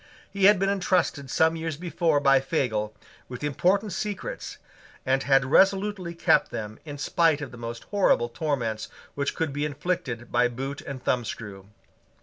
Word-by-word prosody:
He 200 -1 +1
had 205 0 +7
been 195 +1 +1
entrusted 180 -7 0
some 160 +5 +3
years 160 -2 -4
before 170 -3 +1
by 135 -1 +5
Fagel 110 -7 -1 0.3
with 125 +2 -7
important 190 +8 +1
secrets, 205 +1 -5 0.5
and 135 +1 +2
had 135 0 +3
resolutely 190 +3 +2
kept - - +3
them 110 0 -6
in 145 -2 -7
spite 160 +1 +2
of 145 -4 -6
the 120 - -11
most 115 0 -6
horrible 195 - +3
torments 120 -5 -2 0.2
which 140 0 -2
could 160 -4 -2
be 145 +1 -2
inflicted 145 -5 -3
by 120 +1 +3
boot 135 +3 -5
and 135 -2 -7
thumbscrew. 105 -5 -3
145 Hz, 155 wpm, -26 LUFS, 125-170 Hz, 0.5 s, had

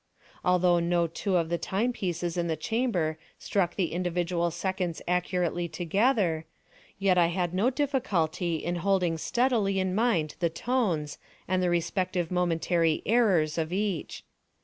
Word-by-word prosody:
Although 180 -1 +3
no 170 0 +1
two 185 +4 -2
of 165 -2 0
the 170 0 -1
time 230 +6 -1
pieces 175 -4 -3
in 175 -1 -1
the 160 - 0
chamber 170 - -1 0.2
struck 180 -4 -1
the 185 -4 0
individual 175 -1 0
seconds 180 -1 -3
accurately 180 -1 0
together, 175 0 +1 0.5
yet 195 -2 +3
I 170 - +5
had 175 0 -1
no 200 +7 +2
difficulty 200 - 0
in 175 +2 -2
holding 180 -2 +1
steadily 225 -4 +1
in 185 -1 0
mind 185 -8 +1
the 170 - +2
tones, 165 - -1 0.3
and 185 0 +1
the 180 - +2
respective 175 0 -1
momentary 170 -2 +1
errors 185 -9 +3
of 160 0 -2
each. 195 -3 -2
180 Hz, 145 wpm, -28 LUFS, 170-195 Hz, 0.5 s, I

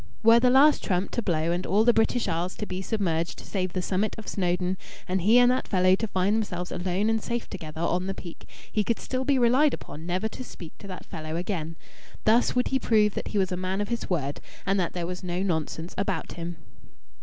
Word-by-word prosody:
Were 230 +1 +7
the 250 +1 +4
last 280 +4 +6
trump 185 0 0
to 240 - -1
blow 165 -5 0
and 175 +1 -1
all 205 +3 +4
the 240 +1 +5
British 225 +2 +2
Isles 170 +3 -1
to 210 - -4
be 185 -1 -4
submerged 170 -6 -1
save 185 -3 -3
the 185 - -1
summit 200 +4 0
of 220 - -9
Snowdon, 180 0 0 0.3
and 185 0 0
he 215 +7 +5
and 245 0 +6
that 255 - -1
fellow 185 -1 +4
to 220 +4 +1
find 195 +1 +1
themselves 180 -5 -2
alone 185 +3 -1
and 225 0 +1
safe 235 +1 -3
together 160 -4 -7
on 180 +2 0
the 195 - -3
peak, 170 -2 -10 0.2
he 210 - +1
could 230 +2 0
still 260 0 -3
be 275 -1 +3
relied 255 +4 +4
upon 160 +3 -10
never 185 +5 0
to 240 - -7
speak 170 -9 -10
to 200 - -10
that 185 -2 -8
fellow 155 0 -6
again. 170 -2 -3 0.5
Thus 230 +4 +4
would 250 - +2
he 265 - +1
prove 210 -4 +3
that - - -4
he 210 - -2
was 190 -2 +1
a - - 0
man 185 +2 -2
of 205 - -2
his 235 -1 -3
word 145 -6 -1 0.2
and 195 0 +2
that 175 - -1
there 175 -2 -2
was 180 +2 -5
no 180 +1 -2
nonsense 160 -1 -2
about 195 -4 -2
him. 170 0 -5
190 Hz, 235 wpm, -27 LUFS, 175-220 Hz, 0.5 s, Were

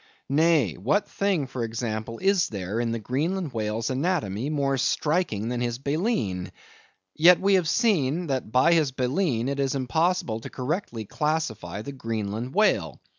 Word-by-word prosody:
Nay; 150 - +3
what 150 - +1
thing, 195 -7 0
for 130 -2 -4
example, 115 0 -4
is 195 -1 +2
there 100 +1 -4
in 120 -1 0
the 115 - -1
Greenland 150 - -2
whale's 110 +1 -2
anatomy 135 - -1
more 140 -3 0
striking 135 - 0
than 120 0 -2
his 120 -1 -1
baleen? 140 - -1 0.6
Yet 175 +3 +7
we 200 +1 +2
have 180 -4 +3
seen 175 - +2
that 130 -7 -3
by 130 +8 +5
his 155 -5 +2
baleen 130 -1 0
it 140 0 -2
is 135 0 0
impossible 160 - 0
correctly 125 - -4
to - - -21
classify 110 - -2
the 140 - -6
Greenland 115 - -4
whale. 215 +1 +2
135 Hz, 155 wpm, -26 LUFS, 115-165 Hz, 0.6 s, Yet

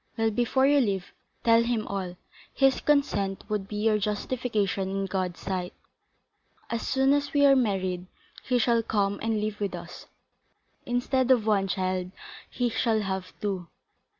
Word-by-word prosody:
Well, 225 0 +2
before 245 +4 +2
you 285 +1 +5
leave, 195 -7 -1 0.3
tell 230 0 +5
him 235 -2 0
all; 185 -3 -4 0.3
his 270 -1 +3
consent 205 -10 +1
would 210 -2 -2
be 210 - -7
your 215 0 +2
justification 210 -2 -1
in 195 0 -2
God's 185 -2 -2
sight. 185 -2 -4 1.0
As 230 -1 -1
soon 265 +1 +3
as 285 0 0
we 285 -1 +5
are 275 -1 +7
married, 190 -7 0 0.4
he 250 - +1
shall 235 0 +3
come 200 -2 0
and 225 -1 0
live 210 0 -3
with 200 -2 -2
us, - - -10 0.8
instead 250 +1 +1
of 245 -5 +4
one 200 -3 +2
child, 185 -1 -1 0.4
he 245 - -1
shall 225 -1 +1
have 190 -2 -3
two. 190 -4 -2
215 Hz, 155 wpm, -27 LUFS, 195-245 Hz, 1.0 s, are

